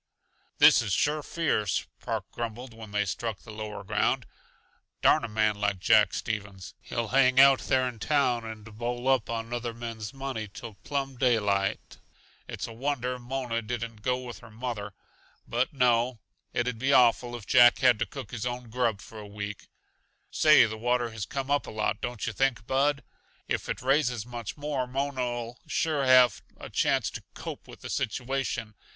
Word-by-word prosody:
"This - - +7
is 105 -4 -2
sure 150 +9 +1
fierce," 140 - 0
Park - - -3
grumbled 120 +1 -5
when 110 -1 -10
they 105 0 0
struck 110 +2 -3
the 110 - -10
lower 105 -1 -6
ground. - - 0 0.8
"Darn - - +5
a - - -2
man 110 -1 +1
like 105 -2 +1
Jack 105 +3 +4
Stevens! 100 -4 -5
He'll 115 -2 -3
hang 130 -1 +4
out 135 -1 +8
there 130 -1 +1
in 120 -3 -6
town 130 -3 +1
and 110 -1 -8 0.2
bowl 120 +1 -3
up 130 -4 +2
on 115 0 -3
other 120 -1 -3
men's 115 -3 -6
money 135 -5 -4
till 110 +3 -9
plumb 135 -2 -3
daylight. 105 -6 +1 0.5
It's - - -5
a 115 - -8
wonder 125 0 -2
Mona 120 -2 -3
didn't 115 -1 -5
go 125 +2 +1
with 125 -2 -8
her 115 - -14
mother. 110 -3 -5 0.5
But 120 +2 0
no 125 -2 +2 0.3
it'd 120 -1 -1
be 135 +3 +1
awful 120 -1 +4
if 115 -4 -8
Jack 120 +2 +7
had 125 -5 +4
to - - 0
cook 130 -7 -8
his 115 -3 -4
own 120 -1 -5
grub 115 -4 0
for 110 - -11
a 105 - -9
week. 105 -1 -7 0.6
Say, 155 -5 +6
the 110 -1 -5
water 120 0 0
has 110 -3 -5
come 135 0 -4
up 145 - +1
a - - -6
lot, 110 0 -1
don't 120 -3 -3
yuh 110 - -3
think, 130 -2 0
Bud? 140 +3 +1 0.4
If - - -2
it - - -3
raises 125 -4 +1
much 120 -1 -6
more 145 -3 -2
Mona'll 125 -3 -3
sure 150 -4 0
have 130 -1 +6 0.2
a - - -10
chance - - +1
to - - -7
'cope - - -7
with - - -13
the - - -7
situation. 120 -1 -2
120 Hz, 180 wpm, -28 LUFS, 110-130 Hz, 0.8 s, out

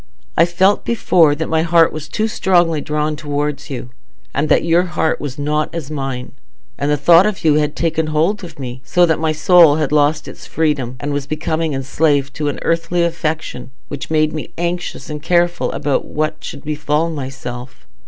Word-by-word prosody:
I 165 - +5
felt 190 +4 +2
before 170 -9 +3
that 160 +2 -3
my 160 0 +1
heart 165 0 +4
was 155 -1 -7
too 220 +6 0
strongly 175 -7 +2
drawn 150 +1 -1
towards 145 -1 -3
you, 125 -3 -6 0.4
and 145 +2 -1
that - - +4
your 170 +1 +3
heart 160 -2 -1
was 145 -1 -5
not 150 +1 -1
as 155 -3 -5
mine; 135 -3 -4 0.4
and 140 +1 -2
the 150 - +2
thought 170 +6 +6
of 205 -5 -4
you 155 - +5
had 150 0 -1
taken 160 -1 0
hold 165 +7 0
of 175 - -10
me, 125 -2 -7
so 175 +8 +3
that 160 -2 +1
my 160 0 +1
soul 160 0 +5
had 150 -3 -1
lost 150 +1 +2
its - - -10
freedom, 145 -6 -1
and 145 +2 -3
was 140 -1 -3
becoming 155 0 -2
enslaved 140 +1 0
to 150 - -1
an 145 - -2
earthly 165 +1 0
affection, 155 -6 -3 0.2
which 140 -3 -6
made 155 -1 +2
me 155 - -6
anxious 175 +1 -3
and 150 -1 -6
careful 175 +1 +1
about 145 -2 -1
what 155 0 -3
should - - -7
befall 150 +2 -1
myself. 130 -3 -7
155 Hz, 190 wpm, -18 LUFS, 145-165 Hz, 0.4 s, thought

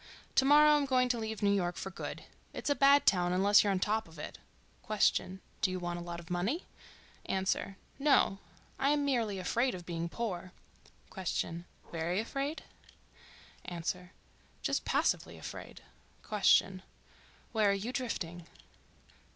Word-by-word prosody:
To 265 - +4
morrow 300 +1 +7
I'm 285 -1 0
going 255 -1 +3
to 240 -1 0
leave 220 -1 -4
New 200 - +4
York 180 -3 0
for 195 - -5
good. - - -6 0.3
It's - - -2
a - - +6
bad 280 0 +5
town 180 -2 +3
unless 200 +3 +5
you're 205 - +1
on 195 - +2
top 215 +3 0
of 165 0 -15
it. 150 - -7 0.5
Q.—Do 190 -2 0
you 185 0 -3
want 175 0 -3
a - - -6
lot 170 0 -6
of 170 +1 -11
money? 200 - -1 0.6
A.—No. 195 +5 +1 0.4
I 275 - +2
am 290 -1 +2
merely 230 -7 0
afraid 235 +7 0
of 175 -1 -9
being 170 -1 -3
poor. 185 -4 -4 0.6
Q.—Very 170 -1 -3
afraid? 275 +7 -3 1.0
A.—Just 180 +1 -5
passively - - 0
afraid. - - -9 0.4
Q.—Where 205 +1 0
are - - +4
you 210 +6 -3
drifting? 175 -10 -4
195 Hz, 135 wpm, -32 LUFS, 180-250 Hz, 1.0 s, morrow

